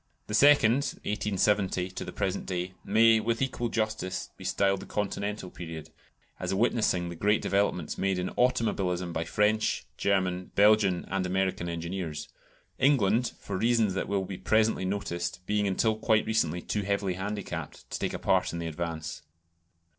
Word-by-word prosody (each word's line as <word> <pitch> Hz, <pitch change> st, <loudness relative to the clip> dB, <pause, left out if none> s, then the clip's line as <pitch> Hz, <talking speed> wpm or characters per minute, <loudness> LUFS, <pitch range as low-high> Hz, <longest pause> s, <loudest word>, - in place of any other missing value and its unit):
The 105 Hz, -, -7 dB
second 130 Hz, -1 st, +6 dB, 0.3 s
(1870 100 Hz, -3 st, 0 dB
to -, -, -5 dB
the -, -, -6 dB
present 95 Hz, 0 st, -2 dB
day) 90 Hz, 0 st, -3 dB
may, 110 Hz, +2 st, +5 dB
with 115 Hz, +1 st, -1 dB
equal 125 Hz, -3 st, -1 dB
justice, 110 Hz, -5 st, -2 dB
be -, -, -12 dB
styled 100 Hz, -1 st, +1 dB
the -, -, -10 dB
Continental 105 Hz, -1 st, -3 dB
period, 80 Hz, -3 st, -8 dB, 0.5 s
as -, -, -1 dB
witnessing 100 Hz, -5 st, +1 dB
the 85 Hz, -, -6 dB
great 105 Hz, +5 st, +2 dB
developments 100 Hz, +1 st, 0 dB
made 95 Hz, -1 st, +1 dB
in 90 Hz, 0 st, -2 dB
automobilism 95 Hz, -8 st, 0 dB
by 80 Hz, 0 st, -2 dB
French, 105 Hz, +4 st, +1 dB
German, 95 Hz, -2 st, 0 dB
Belgian, 100 Hz, -3 st, +4 dB
and 95 Hz, -1 st, -1 dB
American 95 Hz, -2 st, -1 dB
engineers: 85 Hz, -2 st, -4 dB, 0.5 s
England, 125 Hz, -4 st, +3 dB
for 100 Hz, -, -5 dB
reasons 115 Hz, -2 st, +2 dB
that 95 Hz, -, -2 dB
will 100 Hz, -1 st, 0 dB
be 95 Hz, -1 st, -7 dB
presently 110 Hz, -3 st, +2 dB
noticed, 90 Hz, -2 st, -3 dB
being 105 Hz, 0 st, +1 dB
until 110 Hz, +3 st, +1 dB
quite 110 Hz, 0 st, +2 dB
recently 90 Hz, -6 st, 0 dB
too 105 Hz, -, -1 dB
heavily 100 Hz, -1 st, 0 dB
handicapped 100 Hz, +2 st, -5 dB
to -, -, -3 dB
take -, -, -2 dB
a -, -, -2 dB
part -, -, +1 dB
in 85 Hz, -, -5 dB
the 85 Hz, -, -4 dB
advance. 80 Hz, -1 st, -4 dB
100 Hz, 160 wpm, -28 LUFS, 90-110 Hz, 0.5 s, second